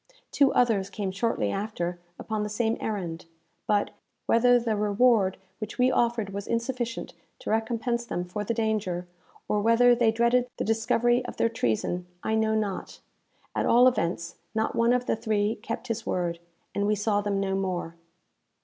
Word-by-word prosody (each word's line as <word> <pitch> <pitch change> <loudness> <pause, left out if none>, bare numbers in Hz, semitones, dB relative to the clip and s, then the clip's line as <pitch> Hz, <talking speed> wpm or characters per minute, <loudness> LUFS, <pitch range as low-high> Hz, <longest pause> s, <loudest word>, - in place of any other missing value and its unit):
Two 280 -2 +4
others 215 -6 +2
came 195 -1 -3
shortly 200 - 0
after 180 -4 -3 0.2
upon 215 -1 -3
the 210 - -2
same 225 +1 0
errand; 175 -6 -4 0.4
but, 205 -1 +2 0.3
whether 245 +2 +5
the 230 -2 -1
reward 210 -1 +3 0.2
which 215 -1 -6
we 250 +1 +4
offered 235 -5 +1
was 200 0 -5
insufficient 235 0 -2 0.2
to - - -5
recompense 230 +2 0
them 180 -6 -3
for 205 +4 -4
the 230 +3 -2
danger, 210 -6 -1 0.4
or 210 - +1
whether 230 +3 +5
they 235 -1 +3
dreaded 235 +2 +2
the - - -1
discovery 240 +2 +2
of - - -7
their 230 - +2
treason, 175 - -1 0.2
I 220 - -1
know 220 0 +2
not 210 -3 -3 0.5
at - - 0
all 245 +2 +6
events, 170 -8 -1 0.2
not 220 0 0
one 230 +1 +3
of 250 0 +1
the - - +1
three 215 0 0
kept 230 +3 -5
his 230 -1 -2
word, 170 -2 -2 0.3
and 200 0 0
we 210 - +2
saw 205 0 +1
them 205 -1 -1
no 195 -1 -1
more. 185 -3 -2
220 Hz, 170 wpm, -27 LUFS, 195-235 Hz, 0.5 s, all